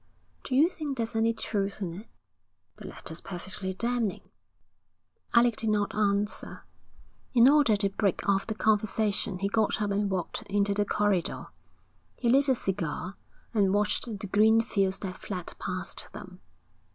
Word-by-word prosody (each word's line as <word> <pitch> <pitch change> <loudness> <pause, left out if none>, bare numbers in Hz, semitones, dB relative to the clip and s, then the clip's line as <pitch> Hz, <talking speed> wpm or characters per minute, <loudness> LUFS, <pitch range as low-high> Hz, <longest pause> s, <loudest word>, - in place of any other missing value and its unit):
'Do 255 - -2
you 295 +5 +6
think 305 -6 -5
there's 225 -1 -2
any 225 +1 +3
truth 200 -3 -2
in 180 -5 -3
it?' 205 +6 -9 0.7
'The - - -9
letter's 160 +1 -5
perfectly 190 +1 -5
damning.' 235 +1 -2 1.0
Alec 235 -1 +5
did 225 - -1
not 205 -1 +1
answer. 205 0 -1 0.7
In 240 0 +7
order 280 -6 +5
to 200 -1 +1
break 195 -1 -1
off 195 -1 +2
the 220 - -3
conversation 210 -2 +1
he 195 +2 -1
got 220 +1 +1
up 205 -1 -1
and 200 0 0
walked 185 -3 -3
into 200 0 +2
the 205 +1 +1
corridor. 205 -4 0 0.7
He 240 - 0
lit 275 +2 +4
a 260 - +4
cigar 185 -2 -3 0.4
and 200 -3 +3
watched 210 +4 +1
the 215 -4 -5
green 215 +3 +4
fields 195 -4 0
that 185 -2 -6
fled 180 -4 -5
past - - -4
them. - - -10
205 Hz, 155 wpm, -28 LUFS, 195-225 Hz, 1.0 s, In